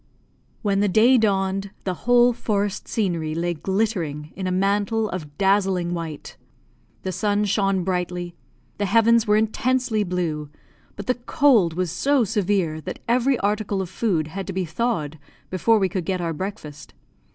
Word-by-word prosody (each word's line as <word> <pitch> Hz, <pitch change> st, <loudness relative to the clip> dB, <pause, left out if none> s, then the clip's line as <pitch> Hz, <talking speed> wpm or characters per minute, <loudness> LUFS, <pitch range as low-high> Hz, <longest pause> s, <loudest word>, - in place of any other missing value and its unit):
When 200 Hz, -2 st, +1 dB
the 205 Hz, -, +3 dB
day 230 Hz, +6 st, +5 dB
dawned, 195 Hz, -2 st, 0 dB
the 185 Hz, -, -1 dB, 0.2 s
whole 245 Hz, 0 st, +6 dB
forest 205 Hz, -4 st, -2 dB
scenery 170 Hz, -7 st, -1 dB
lay 175 Hz, +1 st, -1 dB
glittering 170 Hz, -5 st, -2 dB
in 190 Hz, -1 st, -3 dB
a -, -, -1 dB
mantle 205 Hz, +4 st, +1 dB
of 150 Hz, -5 st, -7 dB
dazzling 190 Hz, -3 st, +2 dB
white; 165 Hz, -3 st, -6 dB, 0.7 s
the 190 Hz, -, -2 dB
sun 205 Hz, +2 st, 0 dB
shone 195 Hz, -2 st, +1 dB
brightly, 180 Hz, -1 st, -2 dB, 0.5 s
the 205 Hz, -, 0 dB
heavens 230 Hz, +2 st, +4 dB
were 210 Hz, 0 st, +4 dB
intensely 235 Hz, 0 st, +1 dB
blue, 170 Hz, -5 st, -2 dB, 0.5 s
but 200 Hz, -, -7 dB
the 250 Hz, -, +2 dB, 0.2 s
cold 245 Hz, -, +4 dB
was 180 Hz, -2 st, -1 dB
so 275 Hz, +8 st, +2 dB
severe 190 Hz, -6 st, 0 dB
that -, -, -6 dB
every 250 Hz, +2 st, +2 dB
article 205 Hz, -1 st, 0 dB
of 190 Hz, -2 st, -4 dB
food 180 Hz, -7 st, 0 dB
had 195 Hz, +3 st, -6 dB
to 190 Hz, -, -4 dB
be 185 Hz, 0 st, -1 dB
thawed 160 Hz, -5 st, -2 dB, 0.3 s
before 190 Hz, +5 st, +3 dB
we 195 Hz, -2 st, +2 dB
could 185 Hz, -2 st, -3 dB
get 185 Hz, +1 st, -1 dB
our 170 Hz, -1 st, -2 dB
breakfast. 155 Hz, -4 st, -7 dB
195 Hz, 160 wpm, -23 LUFS, 175-215 Hz, 0.7 s, whole